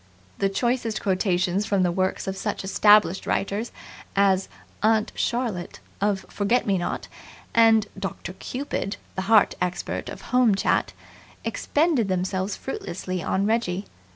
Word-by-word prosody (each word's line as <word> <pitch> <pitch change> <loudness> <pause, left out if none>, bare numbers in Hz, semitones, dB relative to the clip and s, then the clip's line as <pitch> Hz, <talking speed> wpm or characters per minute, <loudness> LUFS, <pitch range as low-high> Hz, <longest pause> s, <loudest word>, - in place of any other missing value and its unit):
The 195 - +2
choicest 230 +2 0
quotations 185 0 +1
from 200 -3 +2
the 175 - +2
works 185 +1 -1
of 190 -1 -3
such 195 - -3
established 200 -1 +4
writers 205 +4 -1 0.4
as 195 -1 +3 0.3
"Aunt 220 0 +3
Charlotte" 235 -8 -2 0.2
of 200 -1 0
Forget 210 +5 +1
Me 195 -3 +1
Not 175 - -3 0.5
and 225 -2 +5
"Doctor 195 -2 -5
Cupid", 250 -1 -4 0.2
the 190 - -3
heart 220 -2 +6
expert 180 0 -2
of - - -8
Home 250 -5 +5
Chat, - - +1 0.5
expended 295 - +1
themselves 185 +1 -1
fruitlessly 185 -7 -5
on 195 +3 0
Reggie. 210 -4 0
200 Hz, 130 wpm, -25 LUFS, 190-225 Hz, 0.5 s, heart